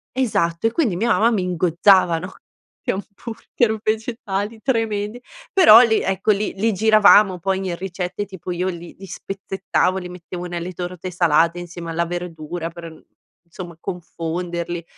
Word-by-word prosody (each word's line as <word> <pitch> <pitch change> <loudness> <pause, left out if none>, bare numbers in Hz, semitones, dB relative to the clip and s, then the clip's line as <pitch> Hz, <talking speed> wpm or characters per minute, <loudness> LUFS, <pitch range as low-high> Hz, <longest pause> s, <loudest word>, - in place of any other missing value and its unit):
Esatto, 205 -7 +1
e - - -1
quindi 235 - 0
mia 230 +6 0
mamma 230 +2 +4
mi 200 -5 0
ingozzava, 180 0 +3
no, 185 +2 -8 0.5
di - - -1
hamburger 220 +2 -3
vegetali, 220 -1 -2
tremendi, 225 -2 -1 0.3
però 250 - +9
lì, 220 -3 +3
ecco, 195 +2 +1
li 205 +1 -1
li 220 +2 0
giravamo, 205 -2 +5
poi, 190 +2 0
in 175 - -2
ricette, 185 +2 -4
tipo 185 -2 -8
io 180 +2 -1
li 175 -1 -8
li 195 - -10
spezzettavo, 195 0 -2
li 180 -1 -8
mettevo 180 0 -8
nelle 175 +1 -5
torte 180 +1 -6
salate 170 0 +2
insieme 175 -1 -7
alla 170 +1 0
verdura, 170 -1 -5
per 170 -1 -9
mhmm, 160 - -17 0.4
insomma, 170 -1 -10
confonderli. 170 -1 -4
185 Hz, 150 wpm, -21 LUFS, 175-210 Hz, 0.5 s, però